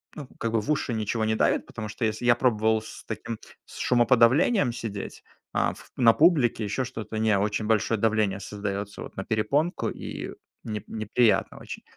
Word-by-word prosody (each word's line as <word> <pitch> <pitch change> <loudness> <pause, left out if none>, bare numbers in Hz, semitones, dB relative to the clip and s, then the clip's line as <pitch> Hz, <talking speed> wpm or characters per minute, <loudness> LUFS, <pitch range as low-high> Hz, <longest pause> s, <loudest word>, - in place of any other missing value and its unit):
ну, 145 -4 -7
как 115 -1 -2
бы 110 - +2
в 150 - -2
уши 135 -4 0
ничего 110 +1 -1
не 110 0 +1
давит, - - +2
потому 110 -1 -7
что 110 +2 -2
если 110 +2 -2
Я 120 -1 +6
пробовал 110 -3 +2
с 110 - -11
таким 115 0 -5 0.3
с - - -13
шумоподавлением 125 - +4
сидеть, 105 -4 -6 0.3
а - - +1
в - - -15
на 115 -3 +6
публике, 145 -9 +3
ещё 125 +5 -1
что-то- 110 -3 -6
не, 110 -2 +3
очень 105 +2 -1
большое 110 0 +2
давление 110 -3 +1
создаётся 100 0 -5
вот - - -9
на - - -4
перепонку, 145 - 0
и - - -6 0.3
не 105 -2 -4
неприятно 110 -1 +1
очень. - - -8
110 Hz, 180 wpm, -26 LUFS, 105-120 Hz, 0.3 s, Я